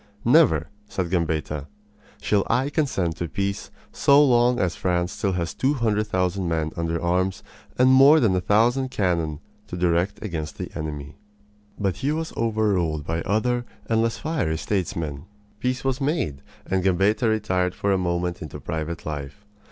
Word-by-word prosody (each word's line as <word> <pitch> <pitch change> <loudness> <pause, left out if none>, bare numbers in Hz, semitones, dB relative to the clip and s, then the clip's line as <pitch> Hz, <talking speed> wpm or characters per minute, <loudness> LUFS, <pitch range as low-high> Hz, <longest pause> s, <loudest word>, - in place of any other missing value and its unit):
"Never," 120 - +5 0.2
said 95 -4 -3
Gambetta, 80 -4 -1 0.5
"shall 100 -2 +1
I 130 +5 +1
consent 95 - 0
to 85 - -3
peace 100 +4 -3 0.2
so 140 +1 +5
long 120 -1 +3
as 90 -2 0
France 90 -1 0
still 100 -1 -1
has 85 -2 -2
two 140 +3 +1
hundred 110 -4 0
thousand 95 -1 0
men 80 -1 -1
under 85 0 -1
arms 90 +2 0 0.3
and 130 +1 +5
more 140 +4 +7
than 110 -8 +3
a 90 - +1
thousand 120 +7 +2
cannon 85 - -1 0.3
to 90 - -6
direct 90 +3 +1
against 80 -7 -4
the - - -6
enemy!" 75 -2 -6 0.6
But 95 -4 0
he 140 - -1
was 160 +1 -3
overruled 100 -9 0
by 80 +1 -2
other 120 +6 0 0.2
and 115 -1 +1
less 115 0 0
fiery 150 - -1
statesmen. 85 -5 -3 0.3
Peace 125 +2 -1
was 135 0 -1
made, 135 - -1 0.2
and 95 -1 0
Gambetta 95 +5 +2
retired 95 -4 0
for 100 - 0
a 95 - +3
moment 85 0 -1
into 80 - -7
private 80 +1 -4
life. 75 +5 -6
95 Hz, 160 wpm, -24 LUFS, 85-115 Hz, 0.6 s, more